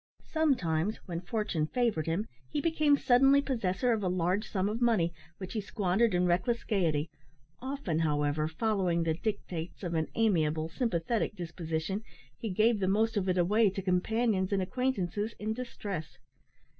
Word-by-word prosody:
Sometimes, 215 - +1
when 170 -2 -4
fortune 180 -6 -1
favoured 220 -8 0
him, 170 +6 0 0.2
he - - -1
became 305 -2 +3
suddenly 270 +1 +5
possessor 240 -4 0
of 220 - -1
a 190 - 0
large 185 +4 0
sum 190 -1 0
of 220 +3 -3
money, 205 -9 +2 0.2
which 190 -2 -7
he 220 - -1
squandered 200 +1 +1
in 180 0 +3
reckless 230 +7 +1
gaiety, 165 -8 +1 0.5
often, 260 - -2
however, 150 -1 +1
following 180 -1 0
the 160 -1 +1
dictates 180 -2 -4
of 175 -2 -3
an 160 -1 0
amiable, 160 -8 +1
sympathetic 215 +2 -1
disposition, 170 +1 -3 0.3
he 225 - -5
gave 215 +3 +3
the 190 - 0
most 220 +4 +2
of 195 -2 0
it 185 - +1
away 205 +5 +4
to 195 0 -5
companions 190 +2 +1
and 195 -2 +1
acquaintances 215 -2 -1
in 215 +1 -2
distress. 200 -9 -6
195 Hz, 155 wpm, -30 LUFS, 170-225 Hz, 0.5 s, suddenly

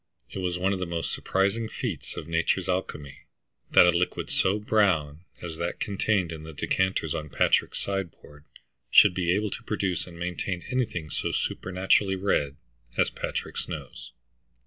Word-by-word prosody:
It - - -5
was 90 -1 -1
one 95 +2 +1
of 95 - -2
the 90 - -2
most 85 -1 -2
surprising 100 +4 0
feats 110 - -5
of 80 - -5
nature's 85 +2 +1
alchemy 90 -6 -3 0.4
that - - +8
a 90 - +6
liquid 90 +1 -1
so 95 +2 +2
brown 90 -8 +1 0.2
as 85 -2 -5
that 85 +1 -3
contained 100 -3 0
in 80 -1 -6
the 80 0 -9
decanters 95 +1 0
on 75 -1 -4
Patrick's - - +2
sideboard 90 -7 -5 0.5
should - - +8
be 90 -1 +1
able 105 +2 +1
to - - -5
produce 100 -6 -1
and 85 -1 -11
maintain 90 +1 -3
anything 95 - -1
so - - -2
supernaturally 95 +1 +1
red 75 -7 0 0.4
as - - +3
Patrick's - - -4
nose. - - -7
90 Hz, 160 wpm, -27 LUFS, 85-95 Hz, 0.5 s, that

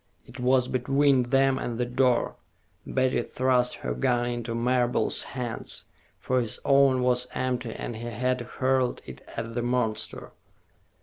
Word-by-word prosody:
It 130 - -12
was 125 0 +3
between 130 0 +2
them 135 0 +3
and 120 -1 -3
the 125 - 0
door. 125 0 +1 0.5
Betty 130 -1 +1
thrust 125 -1 +1
her - - 0
gun 120 -2 +1
into 120 -1 -3
Marable's 125 +1 +1 0.2
hands, 120 -3 -4 0.3
for 130 0 +1
his 115 -3 -2
own 135 -2 +4
was 125 0 +2
empty 125 -2 -1
and 115 - -5
he 120 +1 -6
had 125 +2 -1
hurled 130 +1 0
it - - -10 0.2
at 115 0 -4
the 120 - -1
monster. 120 -3 -2
125 Hz, 145 wpm, -27 LUFS, 120-130 Hz, 0.5 s, own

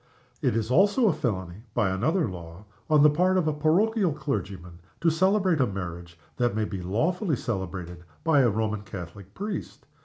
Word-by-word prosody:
It - - +1
is 115 +1 -1
also 205 - +4
felony 100 - -3
(by 100 -3 +2
another 145 - +1
law) 85 +1 -9 0.2
on 150 -2 +5
the 150 - +8
part 180 +5 +2
of 175 -4 +1
a 155 - +1
parochial 180 +5 +2
clergyman 95 - -5 0.2
to 165 0 +3
celebrate 185 -1 +2
a 125 - +3
marriage 85 -3 -6 0.2
that 120 -3 +1
may 110 0 0
be 95 -3 -5
lawfully 155 - 0
celebrated 95 -7 -5 0.2
by 160 -3 +4
a 125 -3 +5
Roman 110 -1 -1
Catholic 95 0 -9
priest. 200 -3 -5
115 Hz, 165 wpm, -26 LUFS, -, 0.2 s, the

